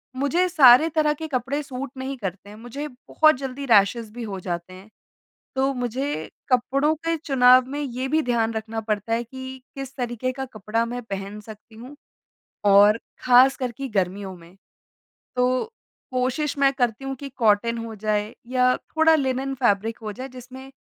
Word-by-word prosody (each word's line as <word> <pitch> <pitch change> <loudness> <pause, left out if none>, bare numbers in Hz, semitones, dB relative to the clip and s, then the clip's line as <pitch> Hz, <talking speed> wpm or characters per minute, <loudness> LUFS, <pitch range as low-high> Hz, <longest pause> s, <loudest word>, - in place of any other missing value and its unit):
मुझे 300 +7 +1
सारे 300 -1 +7
तरह 300 -1 +3
के 315 +1 -6
कपड़े 270 +2 -2
सूट 270 -1 -6
नहीं 265 +1 -4
करते 200 -1 -6
हैं 210 - -11
मुझे 245 +6 -6
बहुत 310 +3 +2
जल्दी 270 +1 -5
रैशेज़ 220 0 +3
भी 240 -1 -6
हो 195 -3 -5
जाते 175 0 -5
हैं। 190 +3 -13 0.7
तो 270 +1 +1
मुझे 245 - -3 0.2
कपड़ों 275 +5 +2
के 330 +1 -2
चुनाव 255 -4 +5
में 290 +1 -4
ये 260 -1 -3
भी 315 +3 +2
ध्यान 230 -2 0
रखना 220 0 -4
पड़ता 215 +1 -2
है 235 +1 0
कि 260 +1 -9
किस 270 -1 -7
तरीके 245 0 -2
का 265 +1 -5
कपड़ा 215 +2 -1
मैं 245 +1 -5
पहन 200 0 -6
सकती 215 +1 -13
हूँ 250 +6 -11 0.7
और 205 +2 +6 0.3
खास 255 +2 +6
कर 255 -2 -2
की 270 +4 -6
गर्मियों 190 -1 -2
में। 170 +2 -17 0.8
तो 250 0 +2 0.5
कोशिश 260 +4 -1
मैं 275 -1 +4
करती 245 -1 -1
हूँ 270 0 -3
कि 280 - -6
कॉटन 230 +1 +2
हो 225 - -7
जाए 210 0 -1 0.2
या 255 0 +3
थोड़ा 320 0 +2
लिनेन 270 -1 -1
फैब्रिक 225 -3 0
हो 210 -1 -4
जाए 260 +6 -7
जिसमें 260 +1 -11
250 Hz, 175 wpm, -23 LUFS, 220-270 Hz, 0.8 s, सारे